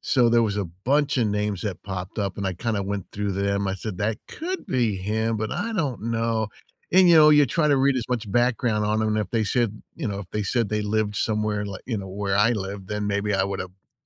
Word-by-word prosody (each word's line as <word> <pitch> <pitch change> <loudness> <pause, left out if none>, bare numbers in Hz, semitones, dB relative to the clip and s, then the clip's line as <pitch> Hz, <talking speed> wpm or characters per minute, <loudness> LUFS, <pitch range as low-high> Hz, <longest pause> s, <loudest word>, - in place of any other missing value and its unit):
so 125 -3 +3
there 115 0 +4
was 105 -2 0
a 100 - 0
bunch 135 - 0
o' - - +3
names 105 -2 -1
that 100 -4 -4
popped 95 +1 -5
up 100 -2 -2
and 100 - -4
I 95 - 0
kinda 110 0 -1
went 100 -1 -3
through 100 -1 -2
them. 100 0 0
I 95 - -1
said, 100 -1 -5
"That 110 +1 -1
could 365 +4 -5
be 115 -6 +1
him, 110 +4 -1
but 110 0 -3
I 230 - -2
don't 145 - -2
know," 115 -1 0 0.4
and, 185 0 +7
you 170 - +7
know, 155 -1 +8
you 150 -2 +6
try 150 +4 +1
to 140 - +4
read 135 +1 +3
as 125 - 0
much 115 -4 -2
background 120 -2 +1
on 105 +1 +1
'em, 110 - +1
and 110 0 +1
if 105 - -2
they 115 -2 +1
said 110 -1 0 0.2
you 140 -9 -3
know, 100 -1 -3
if 100 - -9
they 105 - -1
said 115 +1 0
they 105 0 -1
lived 105 0 0
somewhere 105 -1 0
li 100 -2 -6
you 115 -4 -1
know, 95 -1 -6
where 100 0 -1
I 105 +3 +4
lived, 95 -2 -5
then 105 -1 -2
maybe 100 0 0
I 95 - +2
would've 95 -2 -4
eh 95 +6 -36
105 Hz, 260 wpm, -24 LUFS, 100-120 Hz, 0.4 s, know